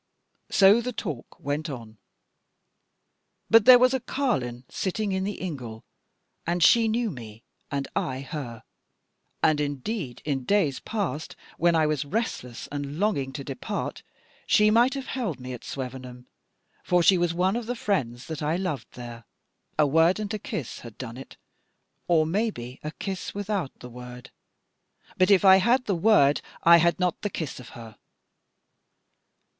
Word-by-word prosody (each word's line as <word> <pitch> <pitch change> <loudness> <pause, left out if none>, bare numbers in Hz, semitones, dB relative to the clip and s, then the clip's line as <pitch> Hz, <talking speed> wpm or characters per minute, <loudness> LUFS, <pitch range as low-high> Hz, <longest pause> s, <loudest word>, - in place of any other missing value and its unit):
So 200 +4 +6
the 250 +1 -4
talk 155 - -6
went 150 +1 -3
on. 115 -5 -8 1.5
"But 225 -2 +7
there 255 -1 +10
was 255 +1 +4
a 265 - +1
carline 130 - -2
sitting 205 +2 -2
in 190 0 -1
the 205 0 -4
ingle, 125 -10 -6 0.6
and 175 0 +1
she 230 +5 +6
knew 225 0 0
me 115 -5 -10 0.3
and 140 -1 -2
I 130 0 -2
her. 130 -5 -7 0.8
And 155 -1 +4
indeed 145 - -4
in 135 -3 -1
days 160 -4 +1
past, 195 -8 -3 0.2
when 170 0 +4
I 160 -1 +3
was 150 -2 0
restless 145 - -3
and 145 0 -4
longing 165 -10 0
to 140 0 -5
depart, 260 - -4 0.5
she 210 0 +5
might 240 +5 +4
have 270 -1 -4
held 220 - -3
me 125 0 -6
at 125 - -9
Swevenham, 125 -2 -7 0.6
for 180 -1 +3
she 185 +1 +5
was 170 -1 0
one 185 +4 +2
of 235 -2 -3
the 245 - -2
friends 130 - -2
that 160 -2 -6
I 150 +2 0
loved 180 -6 -4
there: 120 -2 -9 0.5
a 155 - +5
word 165 +6 +3
and 210 0 -3
a 215 - -2
kiss 140 - -5
had 115 -3 -11
done 115 -3 -7
it, 135 - -11 0.7
or 160 -3 +4
maybe 160 - -2
the 150 - -4
kiss 190 +4 -5
without 200 -7 -2
the 125 - -9
word: 125 +1 -10 0.9
but 185 +1 +4
if 200 -1 +5
I 190 0 +9
had 245 +6 +3
the 200 - 0
word, 170 -6 +4 0.2
I 170 0 +8
had 170 +2 +2
not 180 -1 0
the 205 - -1
kiss 160 -8 -5
of 125 - -11
her. 115 -2 -11
160 Hz, 160 wpm, -26 LUFS, 130-205 Hz, 1.5 s, there